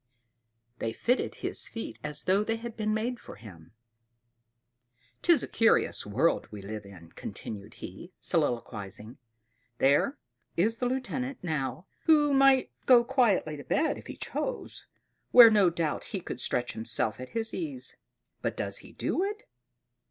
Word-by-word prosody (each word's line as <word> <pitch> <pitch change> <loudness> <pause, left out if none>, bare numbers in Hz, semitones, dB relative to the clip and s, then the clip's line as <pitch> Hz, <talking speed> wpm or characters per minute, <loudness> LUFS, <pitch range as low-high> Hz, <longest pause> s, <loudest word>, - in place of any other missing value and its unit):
They 115 - -2
fitted 250 - 0
his - - -1
feet 225 - -7
as 150 0 -3
though 195 +3 +3
they 225 +1 -1
had 230 0 -7
been 215 -1 -1
made 235 +3 -1
for - - -11
him. 95 -7 -13 1.5
"'Tis 335 -7 +5
a - - -4
curious 225 - +2
world 130 +12 +1
we 105 -2 -9
live 105 0 -6
in," 85 -4 -13
continued 100 -2 -8
he, 135 - -9
soliloquizing. 115 - -2 0.6
"There 145 - +3 0.4
is 220 +7 +2
the 245 - 0
lieutenant, 260 +1 -3
now, 150 -2 -2 0.2
who 295 -3 +5
might 270 -1 +5 0.2
go 245 -2 +8
quietly 235 - +2
to 145 - -8
bed 315 - +1
if - - -13
he - - -8
chose, - - -4 0.4
where 235 -2 +10
no 205 -4 +5
doubt 165 -2 -2
he 200 - -4
could - - -6
stretch 120 0 0
himself 110 0 -1
at 130 - -7
his 225 0 -2
ease; 290 -7 -3 0.5
but - - -2
does - - -3
he - - -14
do 365 - -1
it? 420 +2 -3
195 Hz, 150 wpm, -29 LUFS, -, 1.5 s, where